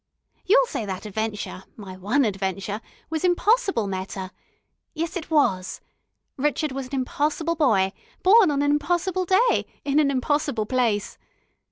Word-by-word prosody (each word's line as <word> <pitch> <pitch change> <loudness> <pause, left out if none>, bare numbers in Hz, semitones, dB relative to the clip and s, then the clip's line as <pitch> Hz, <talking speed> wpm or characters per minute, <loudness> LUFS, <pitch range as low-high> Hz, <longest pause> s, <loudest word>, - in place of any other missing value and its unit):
You'll - - +6
say 355 - -4
that 190 +1 -5
adventure 210 -2 -4
my 195 -4 -9
one 225 +9 +1
adventure 195 +1 -3 0.3
was 320 0 -2
impossible, 390 - +2
Meta. 190 0 -5 0.6
Yes, 330 +1 -3
it 345 -4 -5
was. 195 - +1 0.6
Rrchud 295 +1 0
was 265 -1 -5
an 275 - -5
impossible 300 +5 -1
boy, 210 - +2 0.3
born 400 0 +7
on 285 -1 +1
an 290 - +2
impossible 350 +5 0
day, 400 +7 +3 0.2
in 285 +1 +2
an 295 -2 +3
impossible 280 -3 0
place. 230 -4 0
275 Hz, 140 wpm, -24 LUFS, 205-330 Hz, 0.6 s, born